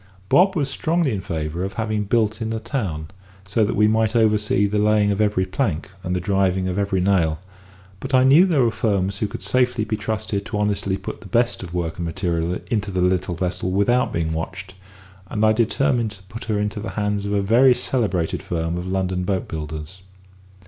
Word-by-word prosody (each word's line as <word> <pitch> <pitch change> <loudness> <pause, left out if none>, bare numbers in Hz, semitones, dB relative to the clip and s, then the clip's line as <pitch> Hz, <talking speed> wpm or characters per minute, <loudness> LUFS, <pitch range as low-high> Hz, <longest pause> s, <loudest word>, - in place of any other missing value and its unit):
Bob 190 +2 +5
was 145 -5 +1
strongly 160 +1 0
in 95 - -3
favour 80 -1 -3
of 95 - -4
having 110 -2 -2
her 105 - -2
built 110 0 +1
in 110 - -2
the 110 0 -2
town, 95 - -4 0.4
so 105 +3 +2
that 105 - 0
we 105 0 +4
might 110 +1 +1
oversee 105 -2 +3
the 105 +1 0
laying 105 -1 +3
of 100 +1 0
every 105 -3 +2
plank, 95 - -2
and 90 0 -2
the - - 0
driving 95 0 +1
of 95 +2 -2
every 100 -2 0
nail; 90 -5 +2 0.6
but 135 - -6
I 130 -1 +5
knew 145 +8 +6
there 150 -8 +3
were 115 - +2
firms 100 -4 -1
who 105 - 0
could - - -7
safely 125 +2 +1
be 110 - -1
trusted 105 -1 -3
to - - -3
honestly 100 -2 0
put 95 - -7
the - - -11
best 120 +5 +1
of 90 -2 -7
work 85 -2 -2
and 85 - -3
material 85 0 -1
into 105 -2 0
the 95 -1 -2
little 90 0 +1
vessel 90 +1 -2
without 100 +7 +2
being 80 -1 -1
watched; 95 +3 -5 0.6
and 110 0 +1
I 110 - +5
determined 120 +1 +1
to 95 0 -14
put 105 +4 -9
her 110 -2 -1
into 105 0 -2
the 110 - -5
hands 105 -1 -1
of 100 - -2
a 100 -1 +1
very 125 +5 +5
celebrated 105 -10 -1
firm 85 0 -2
of 90 - -6
London 95 -1 -1
boat 95 0 -1
builders. 80 +3 -6
100 Hz, 210 wpm, -22 LUFS, 90-110 Hz, 0.6 s, knew